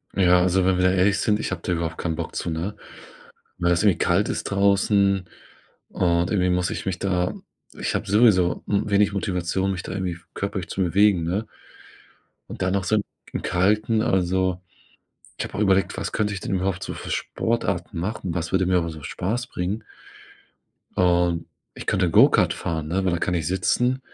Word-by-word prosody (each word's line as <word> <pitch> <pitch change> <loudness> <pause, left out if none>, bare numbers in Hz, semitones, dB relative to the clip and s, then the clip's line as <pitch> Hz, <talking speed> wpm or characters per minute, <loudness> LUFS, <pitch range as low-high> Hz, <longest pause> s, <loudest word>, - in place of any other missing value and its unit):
Ja, 90 -2 +5
also, 90 +1 +2
wenn 95 0 +2
wir 90 - +1
da 90 - +5
ehrlich 95 +2 +3
sind, 105 -1 +1
ich - - -2
habe 95 -3 -4
da - - -2
überhaupt 85 -2 -2
keinen 80 -2 -2
Bock - - -5
zu, 85 - -2
ne? 85 +6 -3 0.8
Weil 85 0 +1
das 85 +1 +2
irgendwie 100 -5 +4
kalt 90 +4 +2
ist - - -3
draußen, 100 -1 +2 0.6
und 85 +1 +1
irgendwie 90 -3 +2
muss 90 0 +1
ich - - -5
mich 95 -2 -2
da 90 -2 0 0.4
ich - - -2
habe - - -2
sowieso, 100 -5 +4
hm, 100 +1 0
wenig 100 0 +3
Motivation, 95 0 -1
mich 90 -2 -4
da - - -6
irgendwie 90 -3 -3 0.2
körperlich 100 -3 -4
zu 95 - -2
bewegen, 95 0 +3
ne? 95 +7 -2 1.0
Und - - -8
dann 90 0 +1
noch 100 -1 0
so 110 - +1
im 105 - +1 0.3
im - - -1
Kalten 105 +4 +1
also 95 0 +1 0.8
ich - - -2
habe - - -9
auch - - -3
überlegt, 95 -2 +2
was - - -4
könnte 105 -1 -1
ich 100 - -4
denn 95 - -2
überhaupt 95 0 -1
so - - -5
für - - -7
Sportarten 100 -6 -2
machen, 95 -1 -3
was 85 0 -3
würde 95 -1 +2
mir 90 0 +3
einfach 85 -1 -2
so 80 -2 -9
Spaß 105 - -3
bringen? 105 -1 -4 1.1
Und 85 -2 +2 0.3
ich - - -8
könnte 90 -3 +1
Go-Kart - - +5
fahren, 80 -2 -3
ne, 95 +4 -1
weil 95 - +1
da - - +1
kann 90 - -1
ich 80 -3 -1
sitzen. 125 +8 +1
95 Hz, 195 wpm, -23 LUFS, 90-100 Hz, 1.1 s, Ja